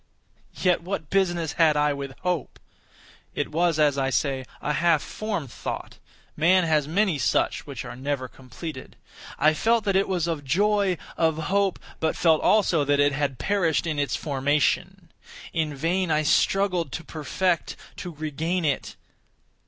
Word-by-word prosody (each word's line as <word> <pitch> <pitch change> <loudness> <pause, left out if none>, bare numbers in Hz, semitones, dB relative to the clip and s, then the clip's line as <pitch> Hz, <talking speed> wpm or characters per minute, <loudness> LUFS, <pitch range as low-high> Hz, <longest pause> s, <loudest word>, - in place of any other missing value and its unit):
Yet 180 -2 +2
what 170 -4 -5
business 175 -5 +1
had 160 -3 +4
I 150 0 +2
with 140 -2 -7
hope? 180 -6 -2 0.8
It - - -2
was, 165 0 +1
as 145 -2 +3
I 135 0 +1
say, 135 -1 -1
a 150 - -1
half 165 -1 +2
formed 200 - -4
thought—man 180 +9 -1
has 155 -3 +1
many 180 -1 +1
such, - - 0
which - - -6
are - - -7
never 130 0 -3
completed. 130 +3 -9 0.4
I 155 +1 +4
felt 225 +7 +2
that 200 -2 0
it 195 - +3
was 180 -4 0
of 165 -4 -3
joy—of 180 -1 +1
hope; 195 +4 +1 0.2
but 160 - 0
felt 160 -2 +3
also 185 -7 +3
that 145 0 +2
it 145 0 +4
had 140 -2 -1
perished 180 -4 +1
in 155 -3 -2
its 140 -6 0
formation. 150 +5 0 0.4
In 155 -3 -1
vain 170 +5 0
I 155 0 +2
struggled 180 +2 +2
to 165 - -5
perfect—to 170 +3 -3
regain 160 +3 -2
it. 140 -3 -1
160 Hz, 150 wpm, -25 LUFS, 145-180 Hz, 0.8 s, had